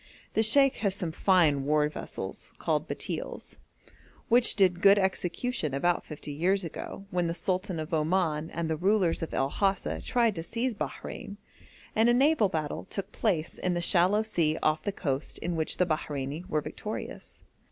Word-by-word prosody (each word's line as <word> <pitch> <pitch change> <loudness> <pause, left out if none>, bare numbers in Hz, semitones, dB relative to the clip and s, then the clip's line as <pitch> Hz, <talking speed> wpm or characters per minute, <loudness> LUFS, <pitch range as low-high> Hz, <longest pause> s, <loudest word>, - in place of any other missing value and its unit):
The 220 - +3
sheikh 270 +5 +4
has 200 -3 0
some 175 -5 -3
fine 160 -6 +3
war 150 +1 +2
vessels, 150 - -7
called - - -1
batils, - - -5 0.7
which 240 +1 +4
did 185 -3 +3
good 200 +1 +7
execution 190 - -1
about 175 +5 +1
fifty 150 -1 -8
years 185 +7 +1
ago, 175 +4 -7
when 180 -1 0
the 165 - -2
Sultan 185 -2 -1
of 155 +1 -5
Oman 160 -1 +1
and 170 -1 -3
the 160 -1 -1
rulers 185 -1 +2
of 165 - -4
El 135 +1 0
Hasa 195 -1 0
tried 235 -3 +2
to 165 - -4
seize 235 +8 -2
Bahrein, 200 0 -6 0.6
and 225 +2 +4
a 240 - +4
naval 270 -5 +4
battle 155 -4 -3
took 195 - -5
place 175 -8 -1
in 180 -1 0
the - - 0
shallow 185 +4 +3
sea 165 -8 +1
off 155 0 +2
the 205 - -2
coast 140 -7 -2
in 175 0 -3
which 160 -1 -1
the 180 - +3
Bahreini 155 +1 -3
were 155 - +1
victorious. - - -7
175 Hz, 175 wpm, -28 LUFS, 155-200 Hz, 0.7 s, good